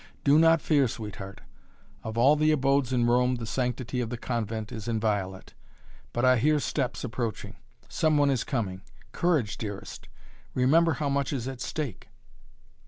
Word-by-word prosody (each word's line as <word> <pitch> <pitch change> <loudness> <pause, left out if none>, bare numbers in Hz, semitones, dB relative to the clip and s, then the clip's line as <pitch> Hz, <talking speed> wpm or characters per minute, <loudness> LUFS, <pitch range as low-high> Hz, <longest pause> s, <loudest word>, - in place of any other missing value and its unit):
Do 145 +2 +5
not 165 -1 +5
fear, 145 -4 +3
sweetheart! 105 -3 -7 0.6
Of 110 +1 -5
all 135 +6 +5
the 155 +1 +3
abodes 135 -3 +2
in 120 -2 +2
Rome 125 +1 +3
the 120 -2 -5
sanctity 125 +1 -2
of 115 - -3
the 120 - -4
convent 110 -3 -3
is 110 0 -7
inviolate! 105 -5 -2 0.6
But 120 +2 0
I 130 0 +5
hear 150 +5 +3
steps 135 -3 -2
approaching 120 -2 -4 0.3
some 155 -2 +1
one 145 -1 +4
is 130 -4 0
coming. 100 -9 -3 0.3
Courage, 155 - 0
dearest 105 -3 -7 0.5
remember 160 +6 +4
how 145 -2 -2
much 140 -1 0
is 130 -4 -3
at 130 -2 -6
stake!" 135 - -5
125 Hz, 160 wpm, -27 LUFS, 115-140 Hz, 0.6 s, Do